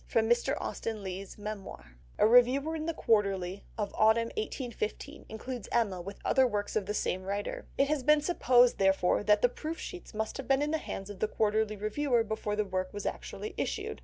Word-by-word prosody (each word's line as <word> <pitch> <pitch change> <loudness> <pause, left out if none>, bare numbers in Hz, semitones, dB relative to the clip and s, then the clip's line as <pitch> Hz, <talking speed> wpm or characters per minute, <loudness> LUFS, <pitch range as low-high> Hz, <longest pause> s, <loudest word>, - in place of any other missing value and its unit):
(Mr. 240 +5 +2
Austen 220 -2 -4
Leigh's 190 +1 -6
Memoir.) 200 - -7 0.3
A - - +5
reviewer 250 +7 +5
in 315 0 -4
The 330 - 0
Quarterly 195 -3 +1
of 205 -2 -2
the - - -13
autumn 220 +2 +4
1815 275 - -4
includes 235 +1 -6
Emma 200 -6 +1
with 195 +3 -8
other 265 -1 +4
works 205 -3 -3
of 205 -3 0
the 210 - -1
same 185 - -1
writer. 200 +2 -4
It 275 - +3
has 300 -1 0
been 300 +3 +4
supposed, 250 -7 +4
therefore, 195 -2 +3
that 210 0 +3
the - - +8
proof 315 +6 -5
sheets 360 - -8
must 220 0 -2
have 270 -3 -6
been 270 +1 +3
in 300 - -1
the 315 - +1
hands 195 -8 -6
of 195 - -10
the 215 - +1
Quarterly 215 0 +1
reviewer 230 +4 +1
before 215 -1 -3
the 210 0 0
work 185 -1 -2
was 205 - -6
actually 430 - -5
issued. 435 +1 -3
220 Hz, 200 wpm, -30 LUFS, 205-270 Hz, 0.3 s, the